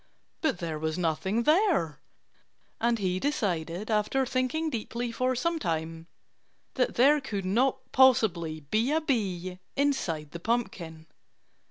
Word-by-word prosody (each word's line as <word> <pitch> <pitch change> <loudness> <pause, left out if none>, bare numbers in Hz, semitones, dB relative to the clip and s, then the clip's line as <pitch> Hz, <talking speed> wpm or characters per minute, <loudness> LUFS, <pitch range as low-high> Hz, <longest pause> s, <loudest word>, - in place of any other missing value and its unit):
But 315 - +1
there 165 -3 -4
was 160 +1 -2
nothing 180 +6 0
there. 310 - +2 0.8
And 235 0 +2
he 185 -3 -1
decided, 195 - -2
after 215 +5 +1
thinking 265 +5 -1
deeply 235 0 -3
for 255 +2 0
some 335 +6 0
time, 165 - -3 0.7
that 250 -2 0
there 285 +4 +5
could 200 -7 -4
not 260 +7 0
possibly 180 -12 +3
be 215 - 0
a 315 - +3
bee 185 - -2 0.2
inside 175 - 0
the 170 - -7
pumpkin. 170 -7 -3
220 Hz, 130 wpm, -28 LUFS, 170-260 Hz, 0.8 s, there